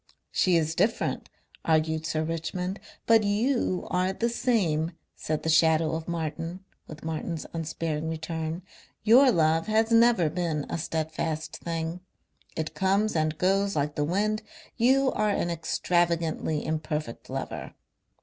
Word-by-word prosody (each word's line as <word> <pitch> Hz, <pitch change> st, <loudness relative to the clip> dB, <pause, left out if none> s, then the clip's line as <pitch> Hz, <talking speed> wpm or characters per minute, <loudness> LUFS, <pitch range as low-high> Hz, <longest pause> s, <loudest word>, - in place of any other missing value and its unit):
"She 185 Hz, -2 st, +3 dB
is 160 Hz, -1 st, 0 dB
different," 220 Hz, +7 st, 0 dB, 0.3 s
argued 160 Hz, 0 st, +1 dB
Sir 155 Hz, -1 st, 0 dB
Richmond. 180 Hz, +4 st, -3 dB, 0.3 s
"But 225 Hz, -1 st, +5 dB
you 210 Hz, -1 st, +1 dB
are 185 Hz, +1 st, +1 dB
the 235 Hz, +4 st, 0 dB
same," 185 Hz, -10 st, +1 dB, 0.2 s
said 155 Hz, -1 st, -3 dB
the 160 Hz, -, -1 dB
shadow 160 Hz, 0 st, +4 dB
of 160 Hz, 0 st, -4 dB
Martin 165 Hz, +1 st, -4 dB, 0.3 s
with 155 Hz, 0 st, -10 dB
Martin's 160 Hz, 0 st, -3 dB
unsparing 160 Hz, -1 st, -3 dB
return. 160 Hz, +1 st, -4 dB, 0.4 s
"Your 250 Hz, +5 st, +7 dB
love 165 Hz, -3 st, +2 dB
has 220 Hz, +1 st, +2 dB
never 230 Hz, -6 st, +5 dB
been 160 Hz, -2 st, -2 dB
a -, -, -2 dB
steadfast 155 Hz, -1 st, -3 dB
thing. 165 Hz, +1 st, -3 dB, 0.6 s
It 160 Hz, -1 st, -3 dB
comes 195 Hz, +2 st, +1 dB
and 155 Hz, -1 st, 0 dB
goes 195 Hz, +3 st, +2 dB
like 145 Hz, 0 st, 0 dB
the 150 Hz, -, -1 dB
wind. 210 Hz, +7 st, 0 dB, 0.3 s
You 265 Hz, +3 st, +3 dB
are 215 Hz, 0 st, +1 dB
an 175 Hz, -4 st, 0 dB
extravagantly 170 Hz, -2 st, 0 dB
imperfect 155 Hz, -5 st, -3 dB
lover. -, -, -5 dB
165 Hz, 135 wpm, -27 LUFS, 160-195 Hz, 0.6 s, Your